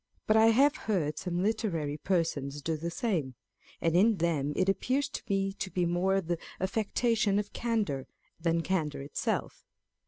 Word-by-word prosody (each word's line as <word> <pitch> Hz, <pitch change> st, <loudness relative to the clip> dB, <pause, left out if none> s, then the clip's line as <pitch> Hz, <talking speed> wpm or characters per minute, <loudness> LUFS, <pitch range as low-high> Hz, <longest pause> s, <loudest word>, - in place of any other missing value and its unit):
But 215 Hz, -, +3 dB
I 220 Hz, 0 st, +7 dB
have 275 Hz, +6 st, +5 dB
heard 155 Hz, -8 st, 0 dB
some 180 Hz, 0 st, -2 dB
literary 190 Hz, -9 st, -1 dB
persons 145 Hz, -5 st, -1 dB
do 160 Hz, +1 st, 0 dB
the 165 Hz, +2 st, -3 dB
same; 170 Hz, -, -1 dB, 0.4 s
and 165 Hz, 0 st, +1 dB
in 210 Hz, +4 st, +5 dB
them 160 Hz, -4 st, 0 dB
it 185 Hz, -, +1 dB
appears 255 Hz, +8 st, +1 dB
to -, -, -5 dB
me 195 Hz, -1 st, +1 dB
to 195 Hz, -1 st, -4 dB
be 180 Hz, -1 st, 0 dB
more 185 Hz, +3 st, +2 dB
the 170 Hz, -1 st, -2 dB, 0.2 s
affectation 215 Hz, +1 st, +1 dB
of 205 Hz, 0 st, -2 dB
candour, 210 Hz, -, -1 dB, 0.3 s
than 165 Hz, 0 st, +1 dB
candour 155 Hz, -7 st, -1 dB
itself. 140 Hz, -, -3 dB
185 Hz, 160 wpm, -30 LUFS, 160-215 Hz, 0.4 s, I